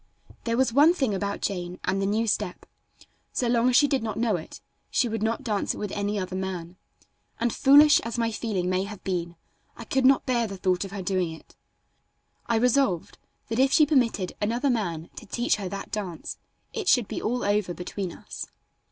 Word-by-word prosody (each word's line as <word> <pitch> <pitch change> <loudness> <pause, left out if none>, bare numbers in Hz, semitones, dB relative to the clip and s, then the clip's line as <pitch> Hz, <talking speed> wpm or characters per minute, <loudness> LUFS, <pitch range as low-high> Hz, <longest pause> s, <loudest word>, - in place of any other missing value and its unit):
There 230 0 0
was 260 -2 +2
one 300 +6 +6
thing 265 - 0
about 200 +1 -3
Jane 180 -2 -3
and 195 +1 0
the 195 - +1
new 220 +3 +1
step: 215 - -2 0.7
so 245 - -1
long 235 +1 +3
as 250 - +2
she 290 - +6
did 275 -2 +1
not 220 -2 -3
know 225 -2 +1
it, 160 - -7 0.3
she 250 - +2
would 225 -1 -3
not 225 +1 -1
dance 210 -4 -1
it - - -9
with 205 -2 -4
any 205 +1 -1
other 185 -1 -3
man, 185 -2 -4 0.6
and 235 0 0
foolish 290 +2 +7
as 230 +1 -5
my 230 -1 +1
feeling 210 -5 -2
may 185 +1 0
have 205 -1 -9
been, 175 -2 -2 0.4
I - - -7
could 265 0 0
not 265 +1 +5
bear 240 -3 +1
the 195 -1 -7
thought 185 0 +1
of 195 - -7
her 195 -1 -5
doing 180 -2 0
it. 160 - -13 0.9
I 235 - +1
resolved 240 -6 +1 0.3
that 225 +2 -1
if 265 +1 +4
she 305 - +6
permitted 245 - +1
another 240 +6 +1
man 175 -8 -2
to - - -9
teach 240 +3 0
her 195 -3 -4
that 195 +1 -6
dance 185 -6 -5 0.3
it 435 -4 -4
should 245 - +4
be - - -4
all 245 +3 -1
over 205 -2 +1
between 180 +1 -5
us. - - -8
210 Hz, 205 wpm, -26 LUFS, 185-245 Hz, 0.9 s, foolish